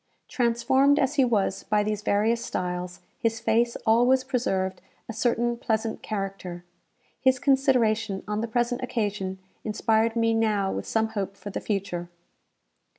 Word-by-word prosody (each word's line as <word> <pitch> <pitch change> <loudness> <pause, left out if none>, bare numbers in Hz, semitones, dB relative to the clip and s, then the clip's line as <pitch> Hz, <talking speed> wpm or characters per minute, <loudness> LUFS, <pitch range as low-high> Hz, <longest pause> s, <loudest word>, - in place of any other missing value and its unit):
Transformed 265 +4 +3
as 280 -1 +2
he 280 -3 +4
was 210 -6 +1
by 210 -1 +1
these 210 0 -2
various 220 +4 +1
styles, 180 -3 -4 0.2
his 225 -1 0
face 235 +1 +1
always 245 +4 +4
preserved 190 -8 -1 0.3
a 225 - -5
certain 240 +1 +1
pleasant 220 -1 -2
character. 195 -4 -5 0.5
His 260 -1 +3
consideration 235 -7 +2
on 210 0 -1
the 230 - -2
present 240 +1 0
occasion 205 -6 -2 0.3
inspired 220 +1 +1
me 230 -1 +2
now 210 -3 +1
with - - -4
some 220 0 +1
hope 200 -2 -4
for 205 - -8
the - - -4
future. 180 -4 -3
225 Hz, 145 wpm, -26 LUFS, 200-240 Hz, 0.5 s, he